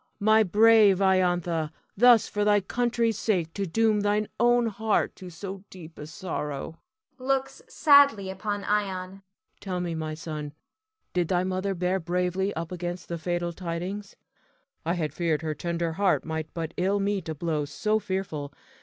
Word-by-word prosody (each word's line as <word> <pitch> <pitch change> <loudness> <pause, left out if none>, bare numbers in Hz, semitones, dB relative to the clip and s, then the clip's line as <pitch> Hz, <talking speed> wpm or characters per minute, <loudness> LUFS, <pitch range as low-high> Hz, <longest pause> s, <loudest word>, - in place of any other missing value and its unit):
My 215 +1 +5
brave 215 0 +6
Iantha, 175 -4 +2 0.3
thus 235 0 +6
for 210 - -1
thy 205 0 +4
country's 230 +1 0
sake 175 -7 0
to 200 -1 -2
doom 220 +4 +2
thine 205 +1 +1
own 240 0 +4
heart 220 0 0
to 185 -2 -9
so 190 +3 -7
deep 170 -3 -12
a 150 - -7
sorrow 155 -2 -5 0.4
[looks 270 - -1
sadly 280 - +5
upon 205 +1 -3
Ion]. 195 -2 -2 0.4
Tell 185 -3 -4
me, 175 -1 -2
my 155 -1 -4
son, 155 -2 -6 0.6
did 175 -2 +1
thy 180 0 +1
mother 190 +1 -2
bear 180 +2 0
bravely 180 +3 -1
up 165 +1 -4
against 175 0 -5
the 170 -1 -3
fatal 175 +1 -2
tidings? 185 +4 -5 0.7
I 170 - +1
had 155 -5 -2
feared 160 -2 0
her 155 -1 -1
tender 170 +2 -2
heart 195 +3 +1
might 160 -1 -4
but 165 -2 -4
ill 195 +3 +1
meet 200 -4 -1
a 160 - -3
blow 155 -1 -1
so 180 +10 0
fearful. 185 -8 -4
185 Hz, 160 wpm, -27 LUFS, 165-205 Hz, 0.7 s, brave